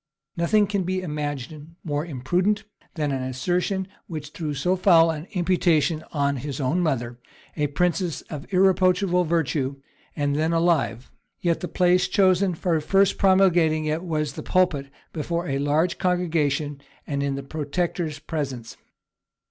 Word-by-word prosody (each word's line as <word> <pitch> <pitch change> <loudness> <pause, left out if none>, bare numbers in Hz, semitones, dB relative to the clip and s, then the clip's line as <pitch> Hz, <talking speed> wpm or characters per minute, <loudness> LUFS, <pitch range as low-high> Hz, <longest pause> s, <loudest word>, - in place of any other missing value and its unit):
Nothing 205 +5 +3
can 200 -1 -1
be 185 +1 -2
imagined 150 0 -5
more 145 -2 -2
impudent 175 - 0 0.3
than 150 -3 -1
this 130 -1 -3
assertion, 180 +6 0 0.2
which 150 -3 -6
threw 150 -3 -4
so 180 +7 +1
foul 170 -3 +5
an 155 +2 -6
imputation 170 -4 +2
on 140 -2 0
his 140 +3 -5
own 145 +6 +1
mother, 120 -7 -1 0.4
a 150 -2 0
princess 175 +3 -1
of 150 +2 -9
irreproachable 185 -1 +3
virtue, 145 -4 0 0.4
and 145 -1 0
then 160 +2 +1
alive; 165 -8 +1 0.3
yet 170 -2 0
the 180 - -4
place 180 +2 +3
chosen 190 -2 +3
for 165 -1 0
first 195 +5 +2
promulgating 175 -5 +4
it 155 +3 -1
was 155 -4 -2
the - - -6
pulpit, 155 -7 +1 0.2
before 170 +3 -2
a 135 -1 -1
large 150 +5 +1
congregation, 155 -6 0 0.2
and 140 -1 -2
in 140 -1 -1
the 140 - -5
protector's 155 +2 -3
presence. 140 -7 -5
160 Hz, 145 wpm, -24 LUFS, 145-180 Hz, 0.4 s, foul